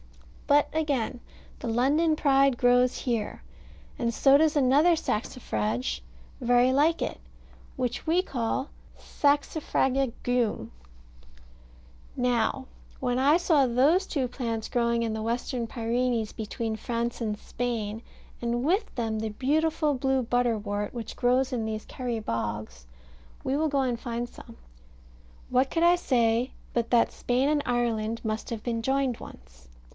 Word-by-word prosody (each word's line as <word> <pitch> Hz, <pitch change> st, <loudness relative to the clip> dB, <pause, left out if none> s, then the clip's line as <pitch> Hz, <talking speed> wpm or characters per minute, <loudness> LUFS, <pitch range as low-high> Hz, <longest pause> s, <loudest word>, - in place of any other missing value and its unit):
But 290 Hz, 0 st, +4 dB
again 280 Hz, -6 st, -1 dB, 0.4 s
the -, -, -5 dB
London 290 Hz, +8 st, +2 dB
Pride 275 Hz, -3 st, +3 dB
grows 245 Hz, 0 st, +3 dB
here, 230 Hz, -4 st, -2 dB, 0.6 s
and 235 Hz, -1 st, 0 dB
so 270 Hz, +4 st, +5 dB
does 310 Hz, 0 st, +3 dB
another 290 Hz, +6 st, +5 dB
saxifrage 125 Hz, -, -2 dB, 0.4 s
very 245 Hz, +1 st, +4 dB
like 310 Hz, +5 st, +3 dB
it, -, -, -4 dB, 0.6 s
which 250 Hz, -2 st, -2 dB
we 335 Hz, +3 st, +3 dB
call 265 Hz, -3 st, -2 dB, 0.3 s
Saxifraga 280 Hz, -3 st, +1 dB
Geum. 245 Hz, -3 st, 0 dB, 1.5 s
Now, 250 Hz, +2 st, +1 dB, 0.3 s
when 250 Hz, -1 st, 0 dB
I 285 Hz, +5 st, +5 dB
saw 320 Hz, -6 st, +3 dB
those 280 Hz, +10 st, +3 dB
two 270 Hz, -5 st, -1 dB
plants 230 Hz, -3 st, -3 dB
growing 235 Hz, -1 st, +1 dB
in 225 Hz, -1 st, -1 dB
the 220 Hz, -, -3 dB
Western 235 Hz, +1 st, -2 dB
Pyrenees, 235 Hz, -1 st, -1 dB
between 220 Hz, +1 st, -4 dB
France 235 Hz, +2 st, -3 dB
and 215 Hz, -2 st, -2 dB
Spain, 225 Hz, -2 st, -3 dB, 0.4 s
and 240 Hz, +1 st, -1 dB
with 380 Hz, +8 st, +1 dB
them 225 Hz, -3 st, -1 dB
the 220 Hz, 0 st, -2 dB
beautiful 305 Hz, +6 st, +1 dB
blue 265 Hz, 0 st, +1 dB
butterwort, 220 Hz, -4 st, -1 dB
which 235 Hz, -3 st, -6 dB
grows 255 Hz, +2 st, +2 dB
in 235 Hz, -3 st, -1 dB
these 220 Hz, -1 st, -4 dB
Kerry 245 Hz, -3 st, -4 dB
bogs 105 Hz, -, -4 dB, 0.6 s
we 270 Hz, -, 0 dB
will 310 Hz, +2 st, +1 dB
go 280 Hz, -1 st, +1 dB
and 245 Hz, -3 st, -1 dB
find 240 Hz, 0 st, -3 dB
some 230 Hz, -1 st, -14 dB, 0.9 s
what 255 Hz, +1 st, +2 dB
could 330 Hz, -, 0 dB
I 345 Hz, +1 st, +6 dB
say 240 Hz, -6 st, +1 dB, 0.2 s
but 235 Hz, -1 st, 0 dB
that 235 Hz, -2 st, +3 dB
Spain 250 Hz, +3 st, 0 dB
and 300 Hz, 0 st, +2 dB
Ireland 230 Hz, -2 st, 0 dB
must 220 Hz, 0 st, -3 dB
have 225 Hz, -2 st, -5 dB
been 230 Hz, -2 st, -2 dB
joined 265 Hz, 0 st, 0 dB
once? -, -, -14 dB
245 Hz, 140 wpm, -27 LUFS, 225-275 Hz, 1.5 s, I